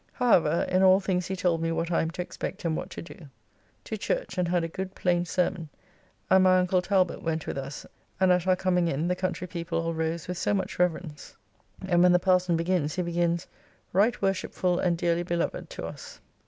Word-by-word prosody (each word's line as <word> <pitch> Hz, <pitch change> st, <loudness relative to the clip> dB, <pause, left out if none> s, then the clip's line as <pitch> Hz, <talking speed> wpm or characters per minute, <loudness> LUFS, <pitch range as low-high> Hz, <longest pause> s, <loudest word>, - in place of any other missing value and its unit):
However, 170 Hz, -, +3 dB
in 185 Hz, 0 st, +2 dB
all 190 Hz, 0 st, +6 dB
things 185 Hz, -2 st, -1 dB
he 190 Hz, -, -3 dB
told 175 Hz, -3 st, 0 dB
me 165 Hz, 0 st, 0 dB
what 165 Hz, +1 st, -2 dB
I 165 Hz, -, +2 dB
am 160 Hz, -, -1 dB
to 180 Hz, +2 st, -4 dB
expect 180 Hz, -, -6 dB
and 160 Hz, -1 st, +1 dB
what -, -, -5 dB
to -, -, -7 dB
do. 170 Hz, -2 st, -12 dB, 0.6 s
To -, -, -5 dB
church, -, -, -2 dB
and 180 Hz, -, +1 dB
had 175 Hz, 0 st, +1 dB
a -, -, -1 dB
good 190 Hz, +3 st, -6 dB
plain 175 Hz, -1 st, +1 dB
sermon, 175 Hz, -2 st, -1 dB, 0.6 s
and 190 Hz, 0 st, +5 dB
my 185 Hz, 0 st, +5 dB
uncle 180 Hz, 0 st, +2 dB
Talbot 185 Hz, 0 st, +1 dB
went 160 Hz, -1 st, -2 dB
with -, -, -4 dB
us 135 Hz, +1 st, -6 dB, 0.3 s
and 190 Hz, -1 st, +4 dB
at 180 Hz, 0 st, +2 dB
our 185 Hz, -, +5 dB
coming 180 Hz, -2 st, +1 dB
in 160 Hz, +1 st, -1 dB
the 180 Hz, -, +1 dB
country 180 Hz, 0 st, -3 dB
people 170 Hz, -1 st, -3 dB
all 165 Hz, 0 st, -2 dB
rose 160 Hz, 0 st, -2 dB
with 180 Hz, -1 st, -4 dB
so 205 Hz, -, +1 dB
much 190 Hz, -2 st, -3 dB
reverence; 165 Hz, -4 st, -2 dB, 0.5 s
and 175 Hz, -2 st, +3 dB
when 180 Hz, 0 st, +6 dB
the -, -, +6 dB
parson 180 Hz, -1 st, +2 dB
begins, 165 Hz, -2 st, 0 dB
he 180 Hz, -, -1 dB
begins 170 Hz, 0 st, 0 dB, 0.5 s
"Right 210 Hz, +6 st, +3 dB
worshipfull 185 Hz, -2 st, 0 dB
and 175 Hz, -2 st, +1 dB
dearly 170 Hz, 0 st, +1 dB
beloved" 170 Hz, -1 st, -2 dB
to -, -, -6 dB
us. -, -, -9 dB
180 Hz, 215 wpm, -27 LUFS, 165-185 Hz, 0.6 s, all